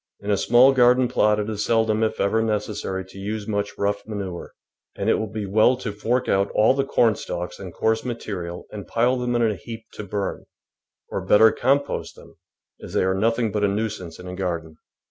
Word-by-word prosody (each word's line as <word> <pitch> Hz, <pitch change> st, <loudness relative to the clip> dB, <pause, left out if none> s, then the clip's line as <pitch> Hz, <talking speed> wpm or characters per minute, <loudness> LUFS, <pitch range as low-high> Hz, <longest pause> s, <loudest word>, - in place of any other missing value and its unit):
In 100 Hz, +1 st, -3 dB
a -, -, +4 dB
small 125 Hz, +6 st, +6 dB
garden 125 Hz, 0 st, +5 dB
plot 105 Hz, -3 st, +2 dB
it 105 Hz, -, -2 dB
is 105 Hz, -2 st, -2 dB
seldom, 110 Hz, -1 st, +2 dB
if 110 Hz, 0 st, 0 dB
ever, 105 Hz, +3 st, +2 dB
necessary 105 Hz, -3 st, -2 dB
to 95 Hz, +1 st, -13 dB
use 105 Hz, +1 st, -4 dB
much 100 Hz, -1 st, -2 dB
rough 100 Hz, 0 st, 0 dB
manure, 100 Hz, -5 st, -6 dB, 0.4 s
and -, -, 0 dB
it -, -, +5 dB
will 110 Hz, -1 st, -3 dB
be 110 Hz, -1 st, -4 dB
well 110 Hz, +6 st, +3 dB
to 115 Hz, -4 st, -4 dB
fork 115 Hz, +5 st, -1 dB
out 100 Hz, +1 st, +2 dB
all 110 Hz, +4 st, +5 dB
the 135 Hz, 0 st, 0 dB
cornstalks 110 Hz, -8 st, 0 dB
and 95 Hz, -2 st, -7 dB
coarse 110 Hz, +6 st, 0 dB
material 95 Hz, -8 st, -5 dB
and 105 Hz, -2 st, -8 dB
pile 120 Hz, +2 st, +2 dB
them 125 Hz, -1 st, -1 dB
in 120 Hz, -, +2 dB
a 110 Hz, -2 st, +2 dB
heap 115 Hz, +3 st, -9 dB
to -, -, -7 dB
burn, 100 Hz, -1 st, -4 dB, 0.6 s
or -, -, -3 dB
better 110 Hz, +1 st, +6 dB
compost 140 Hz, +3 st, 0 dB
them, -, -, -16 dB, 0.4 s
as -, -, -9 dB
they -, -, +2 dB
are 95 Hz, 0 st, +2 dB
nothing 115 Hz, +3 st, +1 dB
but 105 Hz, 0 st, -1 dB
a -, -, +4 dB
nuisance 100 Hz, -5 st, -3 dB
in 90 Hz, -, -10 dB
a 90 Hz, -, -6 dB
garden. 85 Hz, -4 st, -4 dB
105 Hz, 205 wpm, -23 LUFS, 100-115 Hz, 0.6 s, small